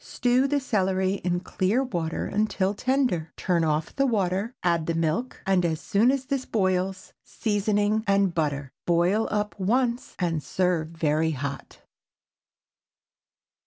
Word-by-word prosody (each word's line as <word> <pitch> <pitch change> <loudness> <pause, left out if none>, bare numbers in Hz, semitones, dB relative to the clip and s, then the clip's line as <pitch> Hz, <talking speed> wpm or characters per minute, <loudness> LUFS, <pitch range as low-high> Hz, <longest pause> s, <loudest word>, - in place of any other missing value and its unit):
Stew 250 +2 +1
the 290 +1 +1
celery 190 -6 0
in 175 0 0
clear 195 +7 0
water 170 -10 -3
until 205 -2 0
tender. 250 - 0
Turn 175 -3 +1
off 155 0 -1
the 275 0 +2
water, 200 0 0
add 170 -3 +1
the 165 - 0
milk, 165 +10 -1
and 190 -2 +2
as 160 -2 0
soon 210 +7 +2
as 265 0 0
this 275 -1 -1
boils, 190 -3 -1
seasoning 210 0 0
and 195 -2 +3
butter. 145 -4 -2 0.2
Boil 175 +6 +2
up 210 0 -1
once 240 +5 0
and 165 -4 -1
serve 180 -2 0
very 160 -1 0
hot. 140 0 -6
190 Hz, 135 wpm, -26 LUFS, 170-220 Hz, 0.2 s, and